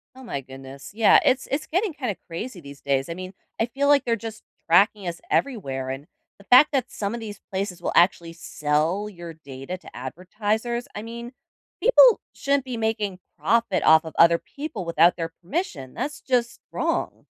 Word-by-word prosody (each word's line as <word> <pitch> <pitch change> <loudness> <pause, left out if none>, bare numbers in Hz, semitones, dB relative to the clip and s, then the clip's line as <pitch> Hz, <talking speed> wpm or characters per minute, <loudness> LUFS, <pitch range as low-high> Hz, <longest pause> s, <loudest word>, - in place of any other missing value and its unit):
Oh 260 - -12
my 230 - -4
goodness. 135 +1 -11
Yeah, 220 0 +6
it's 260 0 +2
it's 285 +3 -1
getting 370 +3 0
kinda 250 -9 -3
crazy 180 +4 -6
these 140 -2 -12
days. 135 -1 0
I 170 - -4
mean, 185 +1 -7 0.3
I 225 - +3
feel 275 +4 -1
like 285 -2 +5
they're 230 -1 +1
just 225 0 -8 0.3
tracking 195 +3 +4
us 170 -1 -4
everywhere 135 - -1
and 135 +2 -6 0.3
the 200 - -17
fact 250 +8 +7
that 260 -3 0
some 200 +1 -3
of 235 - -4
these 210 -2 -8
places 190 -2 -3
will - - -1
actually 170 -1 +3
sell 165 +4 -1
your 170 -4 -9
data 140 +2 -8
to - - -14
advertisers. 210 - -3
I 210 - -5
mean, 235 +2 -8 0.5
people - - +7
shouldn't 280 -1 0
be 255 -2 -5
making 215 -4 -1 0.2
profit 230 -2 +1
off 160 0 +6
of 160 - -8
other 170 0 +6
people 280 - -7
without 170 +1 +4
their 165 -1 -3
permission, 170 - -4
that's 295 +1 -4
just 235 -3 -1
wrong. - - -2
200 Hz, 185 wpm, -24 LUFS, 165-240 Hz, 0.5 s, fact